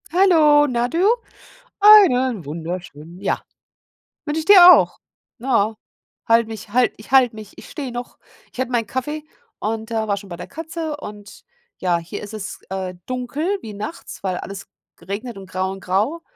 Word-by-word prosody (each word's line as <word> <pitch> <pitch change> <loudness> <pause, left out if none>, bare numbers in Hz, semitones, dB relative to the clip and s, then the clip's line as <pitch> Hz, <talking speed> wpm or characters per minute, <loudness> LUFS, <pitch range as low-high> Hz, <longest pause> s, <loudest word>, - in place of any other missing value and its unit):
Hallo, 315 -5 +5
na 240 -2 0
du. 330 - -2 0.8
Einen 260 - +6
wunderschönen 165 +1 -7
ja. 200 - -1 0.8
Wünsche 305 +1 -2
ich 315 - -5
dir 360 -2 +10
auch. - - +2 0.4
Na, 225 -4 0 0.5
halte 230 0 +4
mich 220 -1 -8
halte 250 +2 +2
ich 215 - -15
halte 255 -4 +5
mich 215 -1 -10
ich - - -12
stehe 275 -5 -6
noch. 245 0 -7 0.3
Ich - - -14
hatte 260 -1 -2
meinen 230 -3 0
Kaffee 295 +5 -4 0.4
und, 220 +1 -4
äh, 220 -1 -1
war 200 -1 0
schon 200 0 -9
bei 175 - -6
der 170 - -9
Katze 320 0 -5
und, 205 -7 -11 0.3
ja, 180 -2 +1
hier 170 +5 -8
ist 205 +1 -9
es, 210 -2 -6
äh, 190 -1 -4
dunkel 280 +10 -2
wie 215 - -8
nachts, 215 +10 -8
weil 185 -2 -1
alles 195 +1 -8 0.3
geregnet 200 +6 -6
und 190 -1 -11
grau 185 +1 -2
und 195 - -7
grau. 210 - -1
230 Hz, 170 wpm, -21 LUFS, 195-295 Hz, 0.8 s, dir